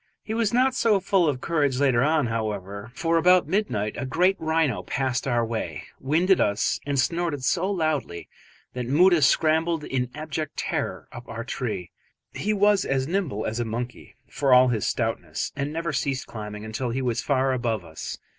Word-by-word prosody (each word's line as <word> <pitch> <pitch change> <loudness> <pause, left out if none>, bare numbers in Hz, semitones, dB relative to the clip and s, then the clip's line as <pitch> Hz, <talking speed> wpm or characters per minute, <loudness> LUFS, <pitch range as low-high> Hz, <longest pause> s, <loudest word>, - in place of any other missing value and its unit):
He 220 - -4
was 225 -2 +1
not 255 +2 +3
so 225 -5 +3
full 185 -3 +2
of 130 -3 -3
courage 145 -6 +1
later 130 -4 +3
on, 150 0 +2
however, 105 -2 -4
for 165 0 +1
about 180 0 +5
midnight 155 - -1
a - - -2
great 180 +8 +2
rhino 160 -6 +1
passed 130 -1 -2
our 120 -2 +1
way, 115 -1 -4 0.2
winded 170 +8 +2
us 100 +1 +1
and 140 -1 0
snorted 165 -1 0
so 180 +8 +1
loudly 155 - -2 0.5
that 125 -1 -4
Moota 170 +5 +5
scrambled 160 +3 +2
in 125 -3 -2
abject 155 0 -5
terror - - -3
up 120 +1 -10
our 115 +1 -5
tree. 110 -8 -4 0.4
He 210 - -1
was 205 -1 +3
as 135 -1 0
nimble 165 - -1
as 115 +2 -2
a - - +1
monkey 120 +1 -6
for 135 -3 +3
all 125 0 +6
his 115 -4 0
stoutness, - - -2
and 140 +1 -2
never 165 0 -3
ceased 135 -1 -1
climbing 105 -1 -7
until 110 +3 -3
he 130 +3 -2
was 120 -3 0
far 135 -2 +1
above 115 -6 -1
us. 80 -1 -7
135 Hz, 180 wpm, -25 LUFS, 120-165 Hz, 0.5 s, all